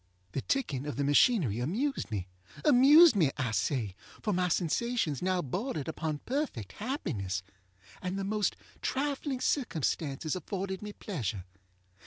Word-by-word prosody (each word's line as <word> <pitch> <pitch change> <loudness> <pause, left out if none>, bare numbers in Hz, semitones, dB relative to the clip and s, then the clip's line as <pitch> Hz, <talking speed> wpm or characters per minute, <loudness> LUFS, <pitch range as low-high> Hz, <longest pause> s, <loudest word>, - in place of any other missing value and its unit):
The 135 - -2
ticking 150 - -1
of 145 - -3
the 140 - 0
machinery 145 - +4
amused 225 - -1
me. 100 -4 -3 0.4
Amused 295 +2 +8
me, 165 -8 +4
I 130 -5 -1
say, 105 0 -1 0.3
for 210 - +1
my 180 0 +2
sensations 175 - 0
now 185 -1 +1
bordered 160 - -3
upon 160 -2 -3
perfect 250 - -2
happiness, 120 - -3 0.6
and 185 +1 -3
the 195 - -2
most 210 +1 0 0.3
trifling 275 -1 -1
circumstances 160 - 0
afforded 190 0 -4
me 210 0 -6
pleasure. 110 - -4
180 Hz, 135 wpm, -31 LUFS, -, 0.6 s, Amused